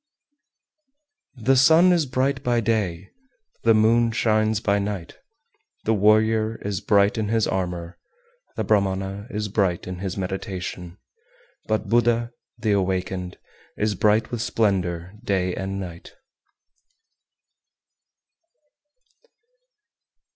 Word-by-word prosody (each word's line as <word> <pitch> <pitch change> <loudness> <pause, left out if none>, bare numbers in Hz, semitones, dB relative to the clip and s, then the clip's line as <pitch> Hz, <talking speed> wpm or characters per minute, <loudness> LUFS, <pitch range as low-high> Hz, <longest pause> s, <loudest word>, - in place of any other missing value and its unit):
387. 125 +2 +2
The 130 - +4
sun 165 +6 +6
is 165 -5 +1
bright 130 +1 0
by 120 -2 +1
day, 100 -5 -1 0.5
the 115 -1 +4
moon 115 +2 +3
shines 110 -1 +1
by 100 -2 +1
night, 100 -4 -5 0.6
the 110 - +1
warrior 110 +1 +3
is 100 -2 -3
bright 100 +1 +3
in 105 - -1
his 110 0 +1
armour, 90 -2 -3 0.6
the - - -2
Brahmana 100 0 0
is 105 -4 -3
bright 95 -4 0
in 90 -1 -6
his 95 0 -4
meditation; 90 -2 -5 0.7
but 110 0 -1
Buddha, 120 0 +2 0.3
the 110 -2 -1
Awakened, 95 -2 -1 0.4
is 105 0 0
bright 105 +3 +2
with 120 -2 -3
splendour 95 -7 -1
day 95 -4 0
and 95 0 -4
night. 85 -3 -9
105 Hz, 110 wpm, -23 LUFS, 95-115 Hz, 0.7 s, sun